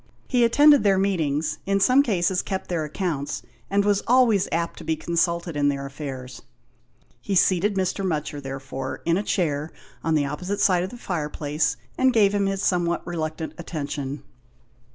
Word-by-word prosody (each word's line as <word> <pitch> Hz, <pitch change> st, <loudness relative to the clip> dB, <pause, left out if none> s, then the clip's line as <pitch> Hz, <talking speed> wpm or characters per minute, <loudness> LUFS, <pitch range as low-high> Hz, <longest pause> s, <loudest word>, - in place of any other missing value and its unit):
He 245 Hz, -2 st, +2 dB
attended 290 Hz, +4 st, +6 dB
their 195 Hz, -2 st, +4 dB
meetings, 155 Hz, -6 st, 0 dB
in 195 Hz, 0 st, +2 dB
some 255 Hz, +7 st, +5 dB
cases 190 Hz, -7 st, +1 dB
kept 190 Hz, -1 st, -4 dB
their 170 Hz, -3 st, -1 dB
accounts, 150 Hz, -2 st, -3 dB, 0.3 s
and 200 Hz, +1 st, +2 dB
was 205 Hz, -1 st, +2 dB
always 235 Hz, -6 st, +4 dB
apt 170 Hz, 0 st, -2 dB
to -, -, -9 dB
be 160 Hz, -, 0 dB
consulted 170 Hz, 0 st, -1 dB
in 145 Hz, -1 st, +2 dB
their 140 Hz, -1 st, -2 dB
affairs. 135 Hz, -3 st, -7 dB, 0.8 s
He 195 Hz, -, -2 dB
seated 190 Hz, +3 st, +3 dB
Mr. 190 Hz, +1 st, -1 dB
Mutcher, 150 Hz, -5 st, -2 dB
therefore, 135 Hz, -1 st, -6 dB
in 170 Hz, -, +3 dB
a 195 Hz, -, +1 dB
chair 155 Hz, -7 st, -1 dB, 0.3 s
on 160 Hz, -1 st, +1 dB
the 145 Hz, -2 st, +2 dB
opposite 180 Hz, +8 st, -3 dB
side 180 Hz, -3 st, +3 dB
of 185 Hz, -, -3 dB
the 245 Hz, -, -10 dB
fireplace, 150 Hz, -, -2 dB, 0.2 s
and 260 Hz, 0 st, +5 dB
gave 210 Hz, -4 st, +4 dB
him 200 Hz, -1 st, +1 dB
his 195 Hz, 0 st, -2 dB
somewhat 175 Hz, -2 st, 0 dB
reluctant 160 Hz, -2 st, -4 dB
attention. 145 Hz, -4 st, -5 dB
170 Hz, 170 wpm, -24 LUFS, 150-195 Hz, 0.8 s, attended